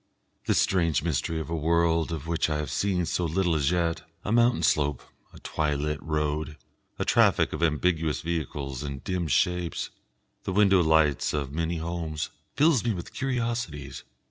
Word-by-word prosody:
This - - +3
strange 85 -5 +2
mystery 80 0 -1
of 80 - -6
a - - 0
world 85 +1 +2
of 80 -3 -4
which 85 -1 0
I 75 - 0
have 75 -3 -3
seen 95 -3 0
so 90 - -1
little 85 +1 +1
as 75 -3 +2
yet 85 -2 0 0.2
a - - -1
mountain 120 +1 +3
slope, 75 -3 +1 0.3
a - - -14
twilit 75 -1 -1
road, 75 -1 -2 0.4
a - - -1
traffic - - +3
of - - -4
ambiguous 80 -2 +1
vehicles 75 -5 -3
and 70 -2 -6
dim 90 -3 -2
shapes, 90 +5 0 0.5
the 95 - -3
window 100 -2 +5
lights 80 -4 +3
of 70 -2 -2
many 85 +2 -1
homes 80 -2 -3 0.2
fills 150 -5 +4
me 115 -2 +1
with 85 - -7
curiosities. 120 - -3
80 Hz, 165 wpm, -27 LUFS, 75-90 Hz, 0.5 s, window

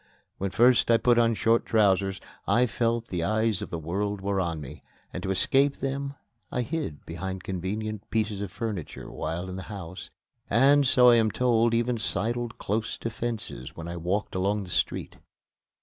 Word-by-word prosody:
When 100 - -1
first 120 +5 +4
I 115 - +6
put 120 0 +4
on 115 -1 +3
short 115 +1 +3
trousers, 100 -3 +2 0.3
I 125 +1 +4
felt 115 0 0
that - - -26
the 90 -3 -1
eyes 110 0 +1
of - - -5
the 85 - -3
world 100 +6 -2
were 100 0 0
on 85 -3 -2
me; 70 -4 -9 0.3
and - - -4
to - - -3
escape 135 +9 +3
them 140 +1 -3 0.4
I 125 - 0
hid 145 - -4
behind 95 +3 -5
convenient 105 +3 -4
pieces 110 -2 -1
of 100 -3 -4
furniture 100 -5 -5
while 85 +4 -4
in 95 0 -6
the - - -5
house 95 -4 -7 0.4
and, 140 +5 +5
so 125 0 +6
I 120 - +6
am 110 -1 +3
told, 115 0 +2
even 120 0 +1
sidled 115 +3 -2
close 110 +2 -2
to 115 - -4
fences 110 - -5
when 85 0 -7
I 85 - -5
walked 90 +5 -2
along 100 +2 0
the 90 - -9
street. - - -1
105 Hz, 185 wpm, -27 LUFS, 95-120 Hz, 0.4 s, I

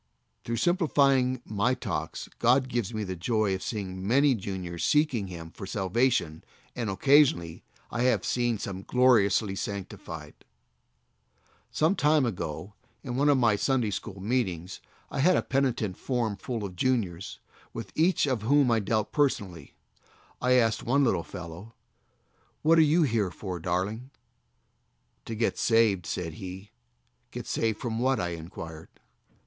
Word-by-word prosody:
Through 115 - -2
simplifying 140 -8 +2
my 110 +4 0
talks - - -4
God 130 +2 +3
gives 120 -5 -2
me 110 -2 -3
the 95 -2 -4
joy 105 +3 0
of 95 - -3
seeing 95 -3 -4
many 140 +4 +4
juniors 95 -5 -5
seeking 145 -9 +2
Him 85 -2 -8
for 95 - -8
salvation, 95 -5 0 0.3
and 115 -4 -2
occasionally 100 - +3 0.3
I 120 - -2
have 125 -5 +2
seen 120 -2 0
some 95 -1 -5
gloriously 110 -4 +3
sanctified. 100 -1 -6 1.4
Some 160 +6 +2
time 150 -4 +3
ago, 95 -2 -4 0.3
in 120 -2 -4
one 145 +3 +3
of 145 - +5
my 115 -4 +3
Sunday 120 +1 +1
after 100 +1 -5
noon 95 +1 -8
meetings, 95 -8 -1 0.3
I - - -3
had 180 +6 +4
a - - 0
penitent 125 -8 0
form 120 -5 -1
full 115 +2 -5
of 95 -2 -7
juniors, 95 -6 -1 0.3
with 115 - -7
each 170 +2 +3
of 130 -6 -1
whom 135 +2 +3
I 115 - +3
dealt 110 +1 -1
person 135 -9 +1
ally. 85 -5 -13 0.7
I 125 +1 +3
asked 115 -3 +3
one 140 +4 +2
little 115 -9 +2
fellow: 90 +5 -9 0.9
"What 165 +2 +5
are - - +8
you 160 +2 +4
here 110 -8 +1
for, 90 +1 -6
darling?" 95 +9 -2 1.2
"To 115 - -5
get 115 +1 0
saved," 110 -6 +3
said 85 -3 -3
he. 95 +2 -8 0.6
"Get - - -7
saved 110 -2 -1
from 115 -3 -3
what?" 130 -1 +2
I 90 - -1
inquired. 80 -1 -8
110 Hz, 150 wpm, -28 LUFS, 95-130 Hz, 1.4 s, are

